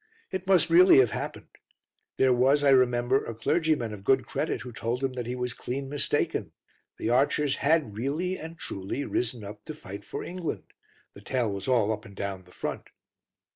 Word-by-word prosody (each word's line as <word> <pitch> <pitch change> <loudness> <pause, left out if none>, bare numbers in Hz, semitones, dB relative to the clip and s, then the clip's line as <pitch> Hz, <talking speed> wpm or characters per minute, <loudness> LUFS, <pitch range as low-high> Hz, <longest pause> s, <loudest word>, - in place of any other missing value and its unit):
It 190 0 -4
must 175 -4 +4
really 180 0 +8
have 125 -5 +5
happened. - - -5 0.7
There 130 -1 +4
was, 135 +4 +3
I 140 - +5
remember, 125 0 +3
a 115 - -6
clergyman 145 -2 +1
of 100 -2 -9
good 130 +4 +3
credit - - -2
who 125 - -8
told 120 +3 -3
him 135 -1 0
that 125 -2 -4
he 125 - -2
was 125 -1 -2
clean 135 +2 -5
mistaken; 145 0 -1 0.4
the 115 - -1
archers 140 +2 +2
had 145 -7 +1
really 150 - -1
and 165 -1 -8
truly 100 +6 -4
risen 120 -2 -1
up 105 +1 -9
to 155 - -6
fight 100 -7 -9
for - - -6
England: 175 -2 -5 0.4
the 100 - -13
tale 120 0 -1
was 100 -1 -5
all 115 -5 +3
up 105 0 -6
and 100 -4 -13
down 95 -2 -5
the 90 - -19
front. - - -5
125 Hz, 190 wpm, -27 LUFS, 110-145 Hz, 0.7 s, really